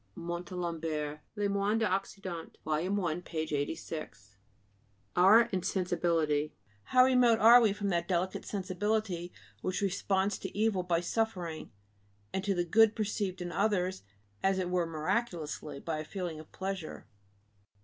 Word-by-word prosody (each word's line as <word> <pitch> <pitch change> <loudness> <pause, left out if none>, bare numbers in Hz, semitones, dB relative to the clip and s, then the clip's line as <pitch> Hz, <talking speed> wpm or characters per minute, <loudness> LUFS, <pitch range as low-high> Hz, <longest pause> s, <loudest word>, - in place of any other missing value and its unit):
(Montalembert, 170 -3 -3 0.2
Les 205 -1 0
Moines 200 +2 +1
d'Occident, 195 -4 -3
vol. 155 +3 0
1, 180 -4 0
p. 170 -2 -9
86.) 145 -7 -5 0.8
=Our 195 +6 +8
insensibility=. 170 -5 0 0.3
How 255 0 +5
remote 250 -3 +5
are 235 +3 +8
we 220 -3 +4
from 205 0 -2
that 170 -2 0
delicate 185 0 -1
sensibility 190 -2 -2 0.3
which 185 +2 -2
responds 195 0 0
to - - -7
evil 215 -3 +2
by 175 -2 +1
suffering 180 -5 -2 0.6
and 190 - -1
to 200 -1 +1
the 175 0 0
good 220 +5 +5
perceived 200 -3 -2
in 175 - -5
others 190 0 0 0.4
as 195 0 +2
it 180 -1 -1
were 180 -2 +1
miraculously, 155 -3 -2
by 160 0 -3
a - - -3
feeling 175 -2 -5
of 155 - -13
pleasure! 190 - -5
180 Hz, 135 wpm, -31 LUFS, 165-205 Hz, 0.8 s, =Our